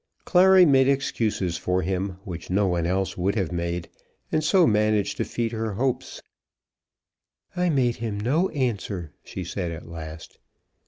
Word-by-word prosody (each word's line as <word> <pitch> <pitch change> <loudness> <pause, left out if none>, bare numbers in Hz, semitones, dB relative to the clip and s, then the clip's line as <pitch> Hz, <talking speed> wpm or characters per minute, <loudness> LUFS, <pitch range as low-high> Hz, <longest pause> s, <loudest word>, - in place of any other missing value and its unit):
Clary 185 0 +6
made 135 -4 +5
excuses 110 -10 0
for 90 +1 0
him 95 +1 -2
which 85 -3 -7
no 100 +3 +2
one 85 -2 0
else 95 +1 -1
would 100 +3 +1
have 95 -6 -1
made, 85 0 -3 0.4
and 155 - +1
so 175 +3 +4
managed 105 -2 +2
to - - 0
feed 115 -1 -2
her 110 -2 -3
hopes. 125 +4 -2 1.3
"I 180 0 +1
made 130 -6 +1
him 110 -3 -3
no 150 - +1
answer," 100 - -3
she - - -6
said 90 -3 -4
at 80 0 -8
last. 80 -1 -9
105 Hz, 155 wpm, -25 LUFS, 90-130 Hz, 1.3 s, Clary